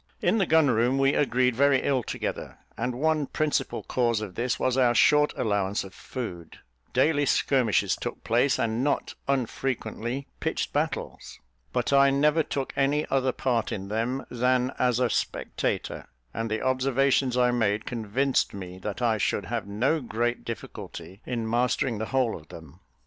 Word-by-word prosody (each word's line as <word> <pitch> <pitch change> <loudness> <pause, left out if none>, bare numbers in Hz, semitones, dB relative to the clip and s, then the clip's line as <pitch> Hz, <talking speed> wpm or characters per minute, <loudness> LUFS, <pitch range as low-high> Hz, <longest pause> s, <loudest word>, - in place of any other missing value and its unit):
In 195 +6 +2
the 190 - +2
gun 160 -4 +4
room 120 +4 +2
we 135 +1 +3
agreed 125 -3 +2
very 140 +1 +3
ill 135 -3 +1
together, - - -5 0.2
and 125 +2 -2
one 155 -1 +1
principal 155 -1 -1
cause 120 -3 +1
of 105 -4 -6
this 120 +3 -1
was 130 -1 +1
our 125 -2 +3
short 150 +6 +5
allowance 100 -3 0
of 95 -1 -11
food 90 -11 -7 0.3
daily 145 +3 +2
skirmishes 125 -7 +2
took - - -6
place, 125 +5 +2
and 115 +2 0
not 145 - 0
unfrequently 130 -1 -2
pitched - - -2
battles; - - -3 0.3
but 125 +2 0
I 140 0 +6
never 150 +3 +3
took 135 -3 -3
any 145 +2 +1
other 130 -1 +2
part 120 -3 -1
in 100 0 -5
them 115 +5 -2
than 125 +1 +1
as 125 -1 +2
a 125 - +3
spectator, - - -2 0.3
and 115 +1 -3
the 110 0 -2
observations 130 0 +2
I 125 -1 +4
made 110 -3 0
convinced 120 +2 0
me 95 -1 -8
that 105 +5 -4
I 110 -2 +2
should 100 - 0
have 115 -4 -3
no 130 +10 +1
great 120 0 -2
difficulty 100 -2 -8
in 115 -3 -2
mastering 120 0 0
the 110 - -3
whole 130 -4 +1
of 75 - -12
them. 80 0 -12
125 Hz, 165 wpm, -26 LUFS, 110-135 Hz, 0.3 s, I